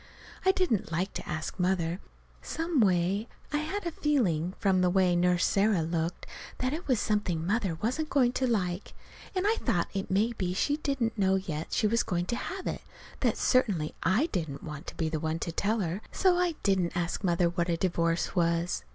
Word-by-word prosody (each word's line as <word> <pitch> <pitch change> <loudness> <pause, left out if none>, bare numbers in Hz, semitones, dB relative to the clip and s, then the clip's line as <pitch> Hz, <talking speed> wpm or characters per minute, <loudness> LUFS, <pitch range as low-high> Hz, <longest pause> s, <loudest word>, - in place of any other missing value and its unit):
I 380 - +7
didn't 355 - 0
like 180 +4 -1
to - - -6
ask 160 +3 -4
Mother. 180 -1 +1 0.4
Some 325 -2 -1
way, 190 +1 +2 0.3
I - - +3
had 355 +6 -3
a 340 - -1
feeling, 190 - +1
from 190 -3 +2
the 180 - +4
way 180 -1 +3
Nurse 180 0 +3
Sarah 200 -4 +2
looked, 165 +1 -2 0.3
that 255 +2 -1
it 330 +4 -5
was 255 -5 +2
something 205 -7 0
Mother 195 -4 0
wasn't 305 +8 0
going 255 -4 +3
to 260 0 0
like. 185 -5 -1 0.4
And 370 +1 0
I 440 +2 +3
thought 190 - 0
if 195 -1 -3
maybe 195 -2 0
she 290 +9 +1
didn't 255 -7 -1
know 190 -1 +3
yet 165 -5 -3
she - - +1
was 230 +2 +3
going 175 -4 -1
to - - +1
have 375 +9 -5
it, - - -3 0.4
that - - +1
certainly 200 - +2
I 215 - +3
didn't 160 -7 -3
want 150 -2 -7
to - - -7
be 160 - 0
the 155 0 -2
one 160 +1 -1
to 165 - -3
tell 210 +6 0
her. 180 +3 -2
So 370 -2 +3
I 355 -2 +1
didn't 185 -4 +1
ask 175 +3 -2
Mother 175 -1 +3
what 170 0 -1
a 170 - +1
divorce 170 -1 0
was. 170 - +1
190 Hz, 200 wpm, -29 LUFS, 170-240 Hz, 0.4 s, I